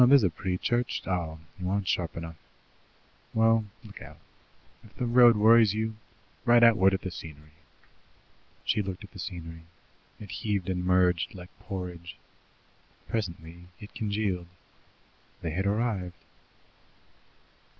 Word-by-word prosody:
There's 130 Hz, 0 st, +7 dB
a 95 Hz, -, +2 dB
pretty 90 Hz, +2 st, -3 dB
church 120 Hz, +5 st, -1 dB
oh, 85 Hz, -4 st, -2 dB, 0.2 s
you 90 Hz, 0 st, -2 dB
aren't 100 Hz, 0 st, -1 dB
sharp 85 Hz, -3 st, -1 dB
enough. 80 Hz, -1 st, -7 dB, 1.0 s
Well, 115 Hz, 0 st, +4 dB, 0.2 s
look 105 Hz, -2 st, -12 dB
out, -, -, -11 dB, 0.7 s
if 110 Hz, -, -18 dB
the 125 Hz, -, -2 dB
road 120 Hz, -1 st, +6 dB
worries 110 Hz, -1 st, +6 dB
you 110 Hz, +1 st, -1 dB, 0.5 s
right 120 Hz, 0 st, +5 dB
outward 110 Hz, -5 st, +6 dB
at 95 Hz, -, -4 dB
the 95 Hz, -, -4 dB
scenery. 75 Hz, -3 st, -10 dB, 0.6 s
" -, -, -34 dB
She 105 Hz, -, +2 dB
looked 95 Hz, -2 st, -5 dB
at -, -, -12 dB
the -, -, -12 dB
scenery. 80 Hz, -2 st, -7 dB, 0.6 s
It 105 Hz, -3 st, -9 dB
heaved 100 Hz, -4 st, -2 dB
and 90 Hz, -1 st, -2 dB
merged 90 Hz, -1 st, +2 dB
like 90 Hz, -1 st, -10 dB
porridge. 90 Hz, -3 st, -7 dB, 0.9 s
Presently 85 Hz, -5 st, -5 dB
it 105 Hz, -, -11 dB
congealed. 100 Hz, -5 st, -2 dB, 1.0 s
They 80 Hz, -, -2 dB
had 95 Hz, +5 st, -1 dB
arrived. 100 Hz, -5 st, -1 dB
95 Hz, 135 wpm, -28 LUFS, 90-110 Hz, 1.0 s, There's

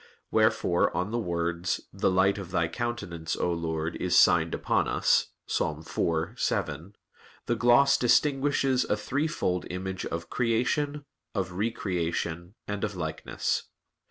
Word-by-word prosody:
Wherefore 110 Hz, -5 st, +3 dB
on 90 Hz, +4 st, -1 dB
the 120 Hz, -, 0 dB
words, 85 Hz, -3 st, -1 dB
"The 100 Hz, -, +1 dB
light 95 Hz, +2 st, +3 dB
of 95 Hz, -3 st, -7 dB
Thy 85 Hz, -3 st, +1 dB
countenance, 85 Hz, -5 st, -3 dB
O 90 Hz, -, 0 dB
Lord, 80 Hz, -1 st, -2 dB
is -, -, +1 dB
signed -, -, +5 dB
upon -, -, +1 dB
us" -, -, +3 dB, 0.2 s
(Ps. -, -, -1 dB
4:7), 80 Hz, +1 st, -2 dB, 0.5 s
the -, -, +1 dB
gloss 140 Hz, +3 st, +5 dB
distinguishes 135 Hz, 0 st, +3 dB
a 105 Hz, -, 0 dB
threefold 130 Hz, -, -1 dB
image 95 Hz, +1 st, -4 dB
of 85 Hz, 0 st, -4 dB
"creation," 140 Hz, +5 st, 0 dB, 0.3 s
of 95 Hz, -3 st, -1 dB
"re 100 Hz, +6 st, 0 dB
creation," 85 Hz, -2 st, -3 dB
and 105 Hz, -1 st, -3 dB
of 105 Hz, -2 st, -2 dB
"likeness." 80 Hz, -3 st, -2 dB
95 Hz, 130 wpm, -28 LUFS, 85-120 Hz, 0.5 s, signed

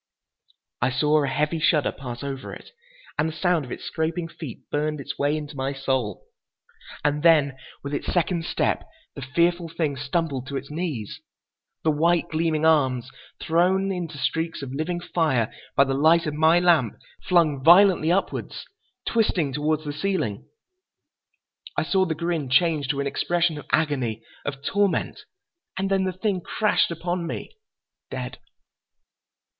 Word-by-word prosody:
I -, -, +3 dB
saw 150 Hz, +3 st, +2 dB
a -, -, 0 dB
heavy 150 Hz, +4 st, 0 dB
shudder 155 Hz, -2 st, +3 dB
pass 125 Hz, -2 st, -7 dB
over 135 Hz, -1 st, -5 dB
it, -, -, -14 dB, 0.5 s
and 155 Hz, +2 st, +2 dB
the -, -, -7 dB
sound 175 Hz, -3 st, +1 dB
of 125 Hz, -, -11 dB
its -, -, -6 dB
scraping 165 Hz, +1 st, -2 dB
feet 160 Hz, -6 st, -9 dB
burned 150 Hz, 0 st, -1 dB
its 140 Hz, +1 st, -6 dB
way 145 Hz, +2 st, +2 dB
into 150 Hz, -1 st, -7 dB
my 135 Hz, +1 st, -2 dB
soul. 130 Hz, -7 st, -2 dB, 0.8 s
And 150 Hz, 0 st, +1 dB
then, 150 Hz, -5 st, +5 dB, 0.3 s
with 140 Hz, +1 st, -5 dB
its 145 Hz, -, -2 dB
second 175 Hz, -1 st, 0 dB
step, -, -, 0 dB, 0.3 s
the -, -, -8 dB
fearful 170 Hz, +5 st, +1 dB
thing 160 Hz, -3 st, -1 dB
stumbled 135 Hz, -1 st, -2 dB
to 140 Hz, -, -3 dB
its 140 Hz, -, -7 dB
knees. 150 Hz, -, -4 dB, 0.6 s
The 160 Hz, -, +3 dB
white, 170 Hz, +3 st, +2 dB
gleaming 160 Hz, -1 st, 0 dB
arms, 130 Hz, -5 st, +2 dB, 0.3 s
thrown 185 Hz, +4 st, +2 dB
into 170 Hz, -5 st, -4 dB
streaks 160 Hz, +2 st, -2 dB
of 130 Hz, -1 st, -6 dB
living 165 Hz, +5 st, -2 dB
fire 150 Hz, -11 st, 0 dB, 0.2 s
by 140 Hz, -, +6 dB
the 135 Hz, -1 st, -1 dB
light 160 Hz, +5 st, +4 dB
of 150 Hz, -, -2 dB
my 160 Hz, +3 st, +4 dB
lamp, 170 Hz, -, +3 dB, 0.2 s
flung 155 Hz, -7 st, +2 dB
violently 175 Hz, 0 st, +6 dB
upwards, 195 Hz, +2 st, -2 dB, 0.4 s
twisting 180 Hz, -, +1 dB
toward 155 Hz, +2 st, 0 dB
the 145 Hz, -1 st, -4 dB
ceiling. 145 Hz, -, -2 dB, 1.3 s
I -, -, +2 dB
saw 190 Hz, -1 st, +2 dB
the 160 Hz, -3 st, -2 dB
grin 165 Hz, -4 st, -2 dB
change 155 Hz, 0 st, +3 dB
to 140 Hz, +1 st, -1 dB
an -, -, -2 dB
expression 170 Hz, +2 st, 0 dB
of -, -, -12 dB
agony, 130 Hz, -8 st, 0 dB, 0.2 s
of 140 Hz, -1 st, -5 dB
torment. 200 Hz, +5 st, 0 dB, 0.5 s
And 195 Hz, +1 st, -1 dB
then 195 Hz, -1 st, +2 dB
the 185 Hz, -, 0 dB
thing 190 Hz, 0 st, -1 dB
crashed 210 Hz, +4 st, +1 dB
upon 170 Hz, +1 st, -3 dB
me—dead. 435 Hz, -, -9 dB
155 Hz, 155 wpm, -24 LUFS, 140-175 Hz, 1.3 s, by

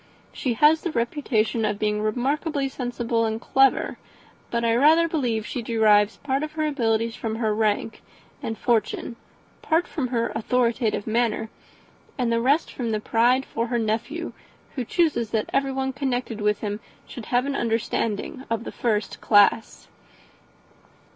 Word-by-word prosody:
She 255 Hz, -, -1 dB
has 300 Hz, +6 st, +5 dB
the 345 Hz, -, -3 dB
reputation 235 Hz, -3 st, 0 dB
of 210 Hz, -1 st, 0 dB
being 210 Hz, 0 st, 0 dB
remarkably 275 Hz, +6 st, -1 dB
sensible 240 Hz, -3 st, -2 dB
and 220 Hz, 0 st, -1 dB
clever; 270 Hz, +3 st, +2 dB, 0.5 s
but 235 Hz, 0 st, -1 dB
I 230 Hz, -, +3 dB
rather 315 Hz, +6 st, +5 dB
believe 245 Hz, -9 st, -1 dB
she 245 Hz, -, -4 dB
derives 215 Hz, -2 st, +3 dB
part 270 Hz, -1 st, -1 dB
of 305 Hz, 0 st, -4 dB
her 310 Hz, 0 st, -1 dB
abilities 230 Hz, -5 st, 0 dB
from 220 Hz, -1 st, -3 dB
her 220 Hz, -2 st, 0 dB
rank 215 Hz, +1 st, -1 dB, 0.4 s
and 225 Hz, -, -4 dB
fortune, 235 Hz, +1 st, 0 dB, 0.5 s
part 330 Hz, +2 st, +1 dB
from 275 Hz, -5 st, -3 dB
her 235 Hz, -2 st, -1 dB
authoritative 230 Hz, -2 st, 0 dB
manner, 225 Hz, -1 st, 0 dB, 0.7 s
and 245 Hz, -3 st, 0 dB
the 230 Hz, 0 st, +1 dB
rest 280 Hz, +6 st, +2 dB
from 240 Hz, -3 st, -3 dB
the 215 Hz, -1 st, 0 dB
pride 240 Hz, +5 st, +2 dB
of 230 Hz, +1 st, -1 dB
her 240 Hz, -, 0 dB
nephew, 235 Hz, +10 st, -2 dB, 0.4 s
who 255 Hz, -, -2 dB
chooses 280 Hz, -7 st, +1 dB
that 220 Hz, -1 st, -2 dB
everyone 270 Hz, -1 st, 0 dB
connected 250 Hz, -5 st, -2 dB
with 210 Hz, 0 st, +1 dB
him 205 Hz, -1 st, -3 dB, 0.3 s
should 240 Hz, -, -9 dB
have 245 Hz, +1 st, +1 dB
an 280 Hz, 0 st, -2 dB
understanding 230 Hz, +1 st, -2 dB
of 230 Hz, 0 st, -1 dB
the -, -, -6 dB
first 215 Hz, -4 st, -2 dB
class." 205 Hz, +1 st, +3 dB
235 Hz, 155 wpm, -24 LUFS, 220-270 Hz, 0.7 s, has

